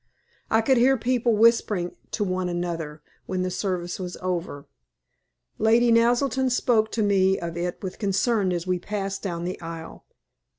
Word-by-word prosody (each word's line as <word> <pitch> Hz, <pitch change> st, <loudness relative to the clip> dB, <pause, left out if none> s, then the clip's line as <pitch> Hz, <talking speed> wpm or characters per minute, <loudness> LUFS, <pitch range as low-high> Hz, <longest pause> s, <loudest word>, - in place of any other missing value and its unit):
I 225 Hz, -, +3 dB
could 260 Hz, +3 st, +3 dB
hear 260 Hz, +3 st, +4 dB
people 240 Hz, -1 st, +1 dB
whispering 215 Hz, -5 st, +3 dB
to -, -, -2 dB
one 185 Hz, -2 st, -1 dB
another 170 Hz, -3 st, -4 dB, 0.2 s
when 185 Hz, -1 st, -1 dB
the 185 Hz, -, -2 dB
service 180 Hz, -2 st, -3 dB
was 180 Hz, -1 st, -5 dB
over. 175 Hz, -6 st, -4 dB, 0.9 s
Lady 230 Hz, +2 st, +4 dB
Naselton 245 Hz, +3 st, +3 dB
spoke 230 Hz, -3 st, +2 dB
to 225 Hz, -, +1 dB
me 195 Hz, -2 st, +3 dB
of 170 Hz, -1 st, -5 dB
it 175 Hz, +2 st, -4 dB
with 190 Hz, -1 st, -6 dB
concern 200 Hz, 0 st, +1 dB
as 175 Hz, -1 st, -2 dB
we 180 Hz, -1 st, 0 dB
passed 195 Hz, 0 st, -4 dB
down 170 Hz, -4 st, -4 dB
the 180 Hz, +1 st, -4 dB
aisle. 165 Hz, -1 st, -8 dB
190 Hz, 160 wpm, -25 LUFS, 175-230 Hz, 0.9 s, hear